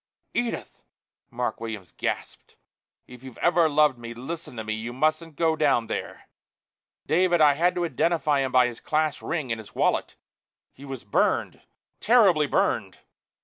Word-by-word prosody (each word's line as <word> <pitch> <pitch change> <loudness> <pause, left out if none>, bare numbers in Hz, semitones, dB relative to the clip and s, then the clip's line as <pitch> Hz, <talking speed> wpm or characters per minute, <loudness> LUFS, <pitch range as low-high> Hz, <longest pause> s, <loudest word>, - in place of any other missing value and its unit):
"Edith!" 240 -1 -3 0.5
Mark 125 0 -3
Williams 110 -6 -7
gasped. - - -5 0.5
"If 125 -1 -13
you've 130 -3 -11
ever 175 -2 +3
loved 150 -4 +3
me, 115 0 -8
listen 155 +4 -7
to 110 - -4
me. 110 0 -3
You 115 +2 -5
mustn't 155 +4 0
go 160 +1 +2
down 140 -7 +2
there. - - -6 0.8
David 175 +1 +2
I 150 -2 +6
had 175 +5 +1
to 175 -1 0
identify 160 -3 +1
him 135 -1 -1
by 125 -1 +5
his 120 -1 -5
class 155 -1 -1
ring 150 -7 -3
and 115 - -2
his 110 - -13
wallet. - - 0 0.6
He 140 - -13
was 135 -3 -7
burned 100 - 0 0.4
terribly 195 -10 +4
burned!" - - 0
145 Hz, 155 wpm, -25 LUFS, 120-165 Hz, 0.8 s, I